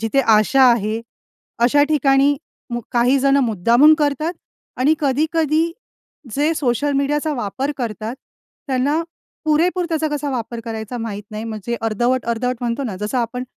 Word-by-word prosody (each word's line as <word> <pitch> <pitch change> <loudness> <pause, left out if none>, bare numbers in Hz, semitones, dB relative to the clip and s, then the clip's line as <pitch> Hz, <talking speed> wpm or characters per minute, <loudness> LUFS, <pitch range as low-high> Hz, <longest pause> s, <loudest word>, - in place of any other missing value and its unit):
जिथे 225 +5 +1
आशा 225 +3 +4
आहे, 220 0 -1 0.6
अशा 250 +5 +4
ठिकाणी 280 -1 +3 0.3
मु 240 0 -2
काही 245 +3 +3
जणं 275 +1 +3
मुद्दामून 235 - +5
करतात 300 +3 0 0.5
आणि 285 +5 +3
कधी-कधी 310 +3 +1 0.6
जे 300 +3 +2
सोशल 285 +1 0
मीडियाचा 295 +2 0
वापर 260 +5 -3
करतात, 225 0 -4 0.5
त्यांना 280 +4 +1 0.4
पुरेपूर 345 +4 +2
त्याचा 315 -2 0
कसा 295 -1 -3
वापर 235 -2 -4
करायचा 225 +1 -5
माहीत 210 -3 -5
नाही, 215 +1 -5
म्हणजे 225 +1 -4
अर्धवट-अर्धवट 240 +2 0
म्हणतो 240 +2 -2
ना, 200 -6 -4
जसं 210 +6 -2
आपण 245 +2 -2
255 Hz, 135 wpm, -20 LUFS, 230-290 Hz, 0.6 s, मुद्दामून